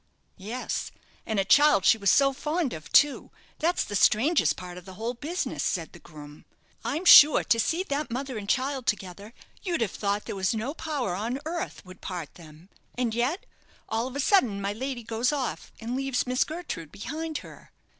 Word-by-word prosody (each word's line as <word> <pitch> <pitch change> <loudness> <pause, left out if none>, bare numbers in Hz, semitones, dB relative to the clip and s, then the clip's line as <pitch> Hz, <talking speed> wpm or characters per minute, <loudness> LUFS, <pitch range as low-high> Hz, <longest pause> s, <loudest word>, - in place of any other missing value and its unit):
"Yes; 225 +7 -4 0.4
and 220 -2 0
a 195 - +1
child 285 -5 +5
she 225 - +5
was 200 -2 +2
so 275 +5 +4
fond 300 +1 -2
of 155 -1 -9
too; 290 -1 +4 0.3
that's 340 +3 +1
the 205 - -6
strangest 215 - +3
part 180 -1 -8
of 180 - -18
the 190 -1 -11
whole 230 +5 -3
business," 315 +9 -4
said 165 -3 -2
the 175 - -12
groom. 150 -2 -13 0.4
"I'm 325 +5 -3
sure 300 -3 +9
to 230 - +2
see 330 +10 0
that 290 -3 -3
mother 260 +2 -4
and 200 -1 -8
child 260 -1 -1
together, 200 0 -3 0.3
you'd 345 -7 -2
have 215 -5 0
thought 205 0 -2
there - - -5
was 190 +2 0
no 235 +6 -3
power 290 - -3
on 225 +8 -3
earth 330 - -5
would 185 0 -13
part 175 -6 -6
them; 160 +1 -15 0.3
and 245 -3 0
yet, 250 - -1 0.4
all 225 +2 -1
of 260 - -9
a - - -3
sudden, 255 - +3
my 200 +1 -2
lady 250 +2 -5
goes 230 +3 0
off, 275 -4 -4
and 235 +2 -4
leaves 270 -1 -1
Miss 250 0 +1
Gertrude 310 - -6
behind 315 +7 -5
her. - - -14
235 Hz, 195 wpm, -27 LUFS, 195-285 Hz, 0.4 s, sure